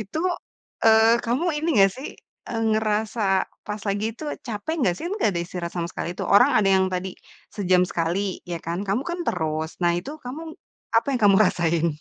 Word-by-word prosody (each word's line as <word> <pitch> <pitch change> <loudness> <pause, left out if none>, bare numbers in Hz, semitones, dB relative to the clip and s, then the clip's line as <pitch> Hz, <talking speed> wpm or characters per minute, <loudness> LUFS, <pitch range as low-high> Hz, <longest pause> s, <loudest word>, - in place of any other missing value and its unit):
itu, 215 +7 -5 0.7
eee, 225 +1 +6
kamu 245 +7 0 0.2
ini 320 - -2 0.2
nggak 195 - +2
sih 275 - -5 0.6
ngerasa 215 +1 0 0.5
pas 210 0 -4
lagi 200 +1 -1
itu 310 - -9 0.2
capek 225 +7 -3
gak 180 - +2
sih? - - -6
Kan 360 - -3
nggak 220 - +2
ada 170 - -1
istirahat 175 -1 -5
sama 170 - -1
sekali - - -4
tuh. - - -2
Orang 245 +7 +7
ada 210 - +2
yang 190 -1 +4
tadi 185 +1 -2 0.5
sejam 185 -3 +3
sekali 180 +3 -1
ya 170 - -2
kan, 170 +1 -2
kamu 205 +7 +1
kan 345 - -3
terus. 160 -2 -1
Nah 175 0 +4
itu 180 - -7
kamu, 260 +6 -6 0.5
apa 225 - +3
yang 250 - -1
kamu 200 -1 +6
rasain? 170 -1 +1
200 Hz, 190 wpm, -24 LUFS, 175-225 Hz, 0.7 s, Orang